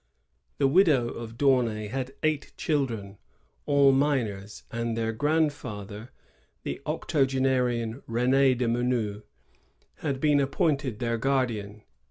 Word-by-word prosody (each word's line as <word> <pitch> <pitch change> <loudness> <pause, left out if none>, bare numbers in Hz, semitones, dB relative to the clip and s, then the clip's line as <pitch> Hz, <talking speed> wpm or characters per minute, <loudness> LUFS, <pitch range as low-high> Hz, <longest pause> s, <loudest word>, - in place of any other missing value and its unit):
The 140 - +3
widow 145 -6 +4
of 115 -1 -8
D'Aunay 120 -6 +2
had 130 +2 -4
eight 155 -2 -1
children, 115 -10 -2 0.5
all 140 -1 +5
minors; 120 -8 -1
and 115 -1 -2
their 115 0 0
grandfather, 120 -6 -2 0.5
the 70 - -5
octogenarian 130 -6 0
Ren^ 130 +2 +3
de 125 -1 0
Menou, 115 -3 0 0.8
had 140 -3 -3
been 150 0 +3
appointed 140 - 0
their 115 -1 -1
guardian. 110 -6 -1
125 Hz, 110 wpm, -27 LUFS, 115-140 Hz, 0.8 s, all